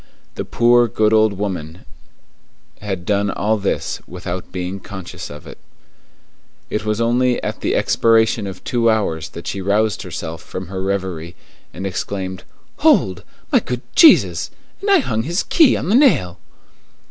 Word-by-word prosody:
The - - -5
poor, 120 0 +4
good 110 0 +1
old 110 -1 +4
woman 90 -5 -5 1.0
had 95 -4 -4
done 100 0 +1
all 110 +3 0
this 100 - -2
without 90 0 -6
being 90 +1 -4
conscious 95 -2 -8
of 75 -1 -10
it. - - -11 1.1
It 105 0 -2
was 105 0 -1
only 120 +2 +2
at - - -4
the - - 0
expiration 110 -3 +2
of 95 -1 -8
two 115 -2 +1
hours 80 -8 0
that 85 - -10
she 100 - -4
roused 105 +2 +1
herself 80 0 -6
from 95 +1 -7
her 95 0 -4
reverie, 95 -4 -3 0.4
and 95 - -7
exclaimed, 95 0 -4 0.3
"Hold! 95 -1 +3 0.3
My - - +5
good 125 -1 -4
God - - -36
Jesus! 325 - +6 0.3
And 405 - -2
I 395 -2 +6
hung 110 - -1
his 170 - -1
key 315 -7 +4
on - - -4
the - - +2
nail!" 95 - +3
100 Hz, 160 wpm, -19 LUFS, 95-115 Hz, 1.1 s, Jesus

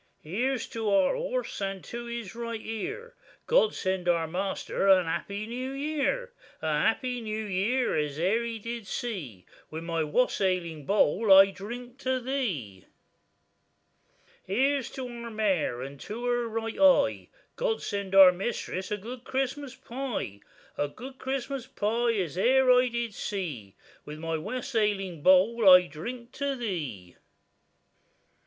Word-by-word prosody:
Here's 240 - -1
to 225 -2 -2
our 195 - +3
horse, - - -3
and 195 -1 -3
to 235 0 -6
his 235 -4 -6
right 230 -1 -4
ear, 225 - -5 0.3
God - - +3
send 185 -2 -1
our 170 -2 +2
measter 190 +3 -2
a 190 -2 +7
happy 200 +5 -3
new 250 +3 -4
year: 310 - -1 0.3
A 155 -1 -1
happy 245 +6 0
new 215 0 -3
year 210 +6 0
as 150 -1 -1
e'er 200 +7 +2
he 230 -1 -4
did 230 -1 -6
see,— 155 - -5 0.2
With 160 +1 -6
my 165 -1 -1
wassailing 170 - 0
bowl 205 +1 +3
I 195 +1 +9
drink 240 +6 -8
to 260 -1 0
thee. 195 - -3 1.6
Here's 265 +6 +1
to 260 -1 -5
our 235 -1 -7
mare, 195 - 0
and 140 +1 -8
to 230 - -6
her 240 -1 +1
right 225 0 -4
eye, 285 -2 +4 0.3
God 480 -2 -1
send 200 -2 -3
our 190 -2 +10
mistress 190 -1 -4
a 210 - -1
good 240 +5 -8
Christmas 270 +1 -3
pie; 255 - -5 0.4
A 145 - +1
good 255 - -10
Christmas 265 -1 -3
pie 230 +3 0
as 180 -4 -2
e'er 260 +4 +5
I 250 0 +5
did 235 -2 -3
see,— 155 - -5 0.3
With 150 +1 -8
my 165 +1 -3
wassailing 205 - -1
bowl 190 +5 +5
I 180 -1 +9
drink 235 - -7
to 280 -1 -2
thee. 150 - -5
220 Hz, 145 wpm, -28 LUFS, 185-250 Hz, 1.6 s, our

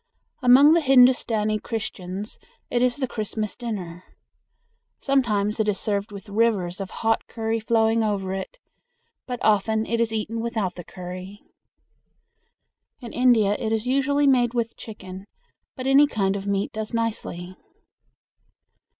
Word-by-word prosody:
Among 270 +5 +7
the 335 - +4
Hindustani 245 -6 +4
Christians 205 -3 -5 0.3
it 240 - +1
is 250 -1 +2
the 265 -2 -1
Christmas 215 -2 -4
dinner. 185 -8 -6 1.0
Sometimes 220 -6 +1
it 215 - +1
is 200 - 0
served 205 0 -1
with 200 +1 -10
rivers 200 -4 0
of 190 - -5
hot 225 0 -1
curry 225 0 -2
flowing 225 0 +2
over 195 -3 -1
it, 195 - -6 0.7
but 250 -1 -3
often 220 +1 +2
it 230 0 -1
is 230 -1 0
eaten 225 +1 -3
without 225 -5 -2
the 175 - -9
curry. 185 +3 -9 1.6
In 235 -2 -9
India 235 -5 +3
it 220 -2 -2
is 220 0 -1
usually 275 +3 +1
made 250 -3 +3
with 230 -1 -1
chicken, 190 -3 -10 0.5
but 255 - -6
any 275 +2 +6
kind 200 -7 0
of 200 0 -5
meat 200 0 -1
does 220 +1 -4
nicely. 185 -6 -3
220 Hz, 140 wpm, -24 LUFS, 200-240 Hz, 1.6 s, Among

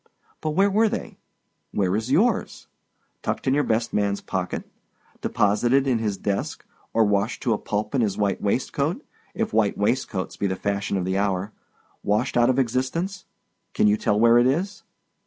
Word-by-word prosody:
But 155 -1 -2
where 195 +2 +4
were 220 +2 +3
they? - - -5 0.5
Where 95 -2 +1
is 110 +3 -2
yours? 210 - +1 0.6
Tucked - - -3
in 130 - +3
your 145 +1 +3
best 115 -1 0
man's 100 -1 +1
pocket; 90 -1 -4 0.5
deposited 120 +7 +2
in 125 -4 +1
his 105 -3 -1
desk—or 100 +3 -2
washed 105 +2 0
to 120 - +2
a 105 - -2
pulp 105 0 -3
in 135 - +2
his 105 -4 0
white 100 -2 0
waistcoat - - -1 0.3
(if - - -2
white 110 -2 +2
waistcoats 100 -2 -1
be 100 - 0
the 95 - -1
fashion 100 0 -1
of 90 - -1
the 95 +1 0
hour), 100 0 -1 0.5
washed 105 +6 0
out 120 0 +4
of 130 - +2
existence—can 135 - -2
you 105 - +4
tell 105 -1 +1
where 115 +1 +6
it 120 - +4
is? 180 +10 -1
110 Hz, 170 wpm, -24 LUFS, 100-130 Hz, 0.6 s, where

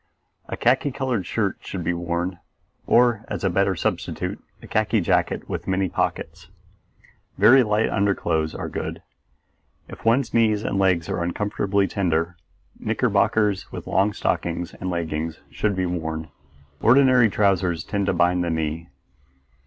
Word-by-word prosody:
A - - -4
khaki 130 +3 +2
colored 125 -8 -2
shirt 105 -4 -1
should 95 -3 -6
be 85 +2 0
worn, 85 +1 -3 0.5
or, 120 -2 +4
as - - -5
a 95 - +2
better 95 +1 +2
substitute, 85 - -3 0.2
a - - -13
khaki 110 +1 +1
jacket 85 - 0
with - - -5
many 95 0 0
pockets. - - -3 0.9
Very 115 +7 +7
light 105 -1 +1
underclothes 85 -6 0
are - - -4
good. - - -5 0.8
If - - -11
one's 115 +2 +2
knees 110 -2 +2
and 95 - -1
legs 90 -4 +2
are - - -2
unfortunately 100 +2 0
tender, 85 -3 -1 0.4
knickerbockers 105 -3 +1
with - - -7
long 100 +2 +2
stockings 85 -2 -2
and 95 - -5
leggings 80 -2 -3
should 105 -2 -1
be 95 0 0
worn; 80 -2 -4 0.5
ordinary 125 -1 +5
trousers 95 -5 +1
tend 100 -1 -2
to 95 - +2
bind 90 +1 +2
the 85 - -1
knee. 80 0 -3
95 Hz, 145 wpm, -23 LUFS, 85-105 Hz, 0.9 s, Very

